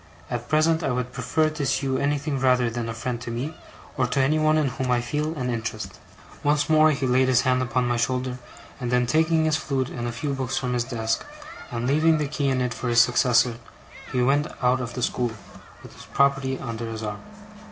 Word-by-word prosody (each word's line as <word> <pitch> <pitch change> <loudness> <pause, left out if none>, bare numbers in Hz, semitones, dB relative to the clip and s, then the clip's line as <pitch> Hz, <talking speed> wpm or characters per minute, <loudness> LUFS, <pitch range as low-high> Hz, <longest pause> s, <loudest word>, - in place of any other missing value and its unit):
At 120 0 -4
present 160 +2 +3
I 145 - -1
would 125 0 -2
prefer 155 -1 0
to 155 -1 -4
see 140 - 0
you 130 -1 0
anything 140 0 -1
rather 125 -2 +3
than 115 -1 -3
a - - -3
friend, 120 +1 -4
to 120 - -6
me, 130 +7 -4 0.4
or 130 -2 +2
to 130 - -1
anyone 155 +3 +3
in 150 -3 +2
whom 130 0 -3
I 125 -1 +3
feel 150 +6 -2
an 125 -4 -2
interest.' 115 -1 -5 0.4
Once 150 +1 +2
more 155 -1 +5
he 140 -3 0
laid 130 +1 +3
his 130 -1 +4
hand 130 0 +2
upon 125 0 0
my 120 0 0
shoulder; 125 +1 -1 0.4
and 125 - -3
then 125 0 +2
taking 160 +4 +2
his 155 -1 +2
flute 135 -4 -2
and 120 -1 -4
a - - -2
few 140 +5 -3
books 135 -1 -2
from 125 -1 -1
his 120 -1 0
desk, 115 -3 -2 0.5
and 120 0 -3
leaving 155 +4 +3
the 150 -1 -1
key 145 -1 -1
in 130 -1 +1
it 125 -1 -1
for 125 - -5
his 120 0 +4
successor, 120 0 +4 0.5
he 125 -1 +1
went 145 +4 +2 0.2
out 125 +1 +3
of 120 -1 -5
the 125 - -3
school, 120 -1 -1 0.5
with - - -12
his - - -13
property 135 -1 +1
under 115 -2 -5
his 110 0 -6
arm. 105 -1 -5
130 Hz, 225 wpm, -24 LUFS, 120-145 Hz, 0.5 s, more